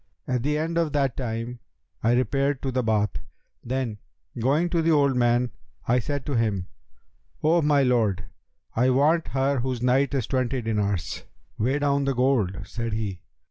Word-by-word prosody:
At 125 -2 0
the 150 +4 0
end 165 +2 -1
of 160 -3 0
that 135 -4 +1
time, 120 -1 -4 0.4
I 115 +2 +3
repaired 135 +3 +1
to 135 - -1
the 130 0 +1
Bath; 105 -8 +1 0.5
then, 120 -4 -2 0.4
going 140 +9 +2
to 170 - +2
the 165 - +1
old 140 -4 +4
man, 120 0 +2 0.4
I 125 +2 +3
said 140 +2 -3
to 145 - -3
him, 110 -6 0 0.8
'O 165 +2 +4
my 145 -2 +3
lord, 110 -7 +1 0.5
I 125 +3 +3
want 150 +6 +3
her 135 +3 0
whose 125 -1 -2
night 135 +3 +2
is 130 -5 0
twenty 130 0 0
dinars.' 105 -5 -2 0.3
'Weigh 130 +6 +1
down 140 -1 +1
the 135 -1 0
gold,' 120 -8 +1
said 115 -1 -4
he. 105 -4 -3
125 Hz, 170 wpm, -25 LUFS, 115-140 Hz, 0.8 s, old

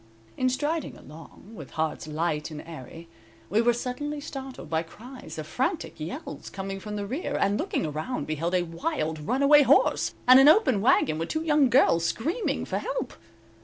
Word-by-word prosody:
In 255 - +1
striding 300 +5 -2
along, 160 +7 -14
with - - -10
hearts 155 -1 -2
light 155 0 -2
and 155 -2 -8
airy, 165 +1 -10 0.4
we 215 +3 +3
were 240 +1 +4
suddenly 255 +5 -4
startled 270 - -8
by 160 +1 0
cries 215 0 -11
of 155 - -5
frantic 255 - -2
yells 155 +3 -7
coming 195 0 -5
from 210 +1 -6
the 205 -1 -3
rear, 285 - -3
and 200 +1 +1
looking - - -1
around 155 - -3
beheld 165 +4 -2
a 180 - +2
wild, 165 - -3
runaway 275 - +5
horse, 280 - +3
and 255 +1 +9
an 270 - +7
open 305 - +5
wagon 160 -8 +3
with 165 - -3
two 315 0 -2
young 300 -4 +3
girls 230 -10 +4
screaming 315 - -1
for - - -2
help. - - -4
210 Hz, 175 wpm, -26 LUFS, -, 0.4 s, and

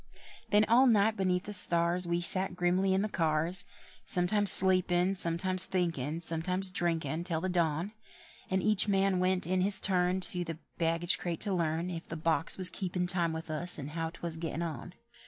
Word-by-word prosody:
Then 210 +1 +2
all 250 +4 +2
night 220 -1 +1
beneath 185 -2 -2
the 210 - -9
stars 175 -1 +3
We 170 0 -3
sat 185 +1 +2
grimly 185 +2 -1
in 190 - -1
the - - -3
cars, 165 0 -1 0.4
Sometimes 195 +3 +4
sleepin', 185 0 +6
sometimes 185 +1 +4
thinkin', 165 -4 -4
sometimes 180 +3 0
drinkin', 165 -3 -3
till 170 -3 -4
the 185 +3 -5
dawn; 170 +1 -3 0.6
And 190 0 -3
each 215 -1 +2
man 195 -2 -1
went 185 -1 -1
in 185 +2 -2
his 195 +1 +6
turn 180 -1 0
To 180 -1 -1
the 165 -2 -8 0.2
baggage 165 +1 0
crate 170 -2 -6
to 205 -2 +1
learn 165 0 -4
If 165 -1 -9
the 165 - -7
box 165 +1 -1
was 185 -1 0
keepin' 180 -1 -5
time 175 -2 -1
with 160 0 -8
us, 175 +3 -2
and 145 0 -9
how 165 0 -5
'twas 170 0 -8
gettin' 165 0 -6
on. 170 +2 -8
180 Hz, 185 wpm, -28 LUFS, 165-190 Hz, 0.6 s, sleepin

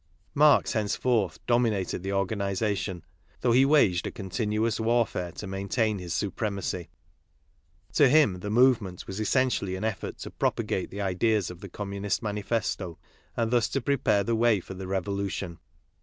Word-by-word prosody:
Marx 150 0 +5
henceforth 110 -3 0
dominated 115 -7 +1
the 95 +1 -3
organization, 100 -2 -1 0.4
though 120 - +2
he 130 +3 +5
waged 120 - +3
a - - -4
continuous 105 +2 -1
war 115 +1 +3
fare 90 -3 -5
to - - -7
maintain 100 +2 -1
his 90 -2 -7
supremacy. 100 -2 -2 1.0
To 140 -3 +5
him, 135 -11 +4
the 105 - -5
movement 110 -6 +2
was 95 +2 -6
essentially 110 -4 +1
an 95 - -5
effort 110 -4 -3
to - - -6
propag*;e 95 - -1
the 100 - -6
ideas 100 +1 +1
of 90 - -11
the 100 0 -9
Com, 100 +2 -6
munist 100 +2 -2
Manifesto 105 -4 -2 0.4
and 115 -1 0
thus 120 -3 +2
to 135 - 0
prepare 120 -6 +1
the 115 +3 0
way 115 -2 +3
for 95 - -9
the 95 0 -7
revolution. 95 -2 -3
105 Hz, 155 wpm, -27 LUFS, 95-115 Hz, 1.0 s, Marx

